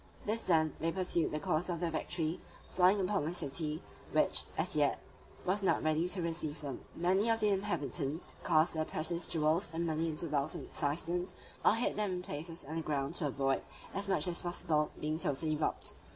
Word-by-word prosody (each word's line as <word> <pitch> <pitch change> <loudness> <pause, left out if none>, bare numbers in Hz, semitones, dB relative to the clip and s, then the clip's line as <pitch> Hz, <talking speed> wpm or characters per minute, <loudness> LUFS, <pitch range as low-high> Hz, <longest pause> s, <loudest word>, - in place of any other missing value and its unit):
This 220 +2 -1
done, 160 -4 +4
they 165 +2 +1
pursued 180 -2 +1
the 150 - -2
course 155 +4 0
of 170 -2 -1
their 170 -1 -1
victory, 160 0 -1 0.3
falling 185 +3 +5
upon 190 -2 +1
the 165 +4 -1
city, 155 0 -1 0.3
which - - +3
as - - 0
yet - - +3 0.5
was 190 +3 +2
not 195 - +2
ready 155 +2 +2
to 180 -1 -1
receive 165 -2 -2
them. 140 -4 -6
Many 190 +6 +2
of 225 0 +3
the 210 -1 +3
inhabitants 165 -6 -1
cast 155 +2 +4
their 160 -1 0
precious 170 +2 +1
jewels 160 +3 +1
and 165 +1 -1
money 160 0 0
into 160 +1 -1
wells 145 0 0
and - - -6
cisterns, 170 +5 -1 0.3
or - - +6
hid 230 -1 0
them 210 -3 +2
in 180 - -2
places 165 0 -6
underground, 150 -2 -2
to 165 -3 0
avoid 135 0 +1 0.3
as 195 +1 -2
much 190 -1 +4
as 175 -1 +1
possible, 165 -3 0
being 155 +1 -1
totally 155 +1 0
robbed. 150 - -1
165 Hz, 190 wpm, -34 LUFS, 155-180 Hz, 0.5 s, or